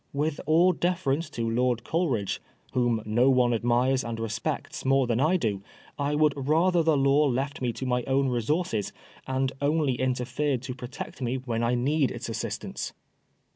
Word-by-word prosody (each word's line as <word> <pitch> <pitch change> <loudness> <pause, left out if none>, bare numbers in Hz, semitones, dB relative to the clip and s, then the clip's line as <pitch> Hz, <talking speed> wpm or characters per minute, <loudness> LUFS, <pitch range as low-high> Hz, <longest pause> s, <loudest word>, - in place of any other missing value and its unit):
With 145 +1 -1
all 170 +4 +5
deference 165 -3 -1
to 115 -6 -3
Lord 120 +1 +1
Coleridge, 135 - -1 0.3
whom 120 -3 +1
no 120 +5 +3
one 125 -2 +3
admires 120 +3 +2
and 115 -1 -4
respects 115 0 -3
more 135 0 +3
than 120 -1 0
I 160 +7 +3
do, 105 - -1 0.4
I 145 +1 0
would 150 -1 +3
rather 165 +6 +2
the 160 -2 +3
law 140 +2 +4
left 140 +3 -2
me 125 -2 0
to 130 - -5
my 125 -1 +1
own 135 +1 +2
resources, 120 - -1 0.4
and 130 0 0
only 145 -1 +2
interfered 130 +1 -1
to 130 -1 -4
protect 125 +1 -8
me 125 0 -1
when 120 -3 -2
I 120 +1 +2
need 140 +3 +1
its 120 -1 -6
assistance. 115 - -4
130 Hz, 170 wpm, -27 LUFS, 120-150 Hz, 0.4 s, all